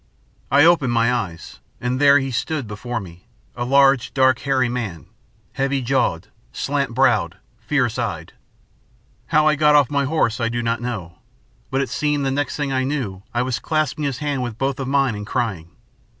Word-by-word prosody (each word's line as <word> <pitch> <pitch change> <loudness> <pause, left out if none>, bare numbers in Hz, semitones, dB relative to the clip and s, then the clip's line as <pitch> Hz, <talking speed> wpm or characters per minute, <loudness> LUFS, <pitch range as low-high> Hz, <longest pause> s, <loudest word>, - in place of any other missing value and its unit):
I 145 +3 +5
opened 165 -7 +4
my 115 +1 +2
eyes, 95 -9 -5 0.2
and 125 +2 -2
there 140 0 +7
he 135 -1 -2
stood 140 +3 -2
before 115 +3 -4
me, 90 -3 -12 0.3
a 120 - -3
large, 135 -1 +3
dark, 130 -2 +4
hairy 135 -3 +1
man, 115 -9 -4 0.5
heavy 135 0 0
jawed, 105 -8 0 0.2
slant 140 -4 -2
browed, 130 -1 +2 0.2
fierce - - 0
eyed. - - -4 0.9
How 155 0 +3
I 155 - +5
got 150 0 +4
off 145 -3 +4
my 140 -1 +1
horse 130 -6 0
I 115 - +1
do 120 0 -2
not 115 0 -1
know. 95 -9 -5 0.5
But 135 +1 0
it 135 - -2
seemed 150 -1 0
that 135 - 0
the - - -2
next 145 0 -2
I 135 -3 0
knew 130 -9 -3
I 120 +1 0
was 130 -2 -2
clasping 155 -2 -1
his 135 -3 -2
hand 145 -2 -2
with 120 -3 -4
both 135 +1 -1
of 135 - -3
mine 135 -3 +2
and 105 0 -7
crying. 95 -10 -2
130 Hz, 185 wpm, -21 LUFS, 115-140 Hz, 0.9 s, there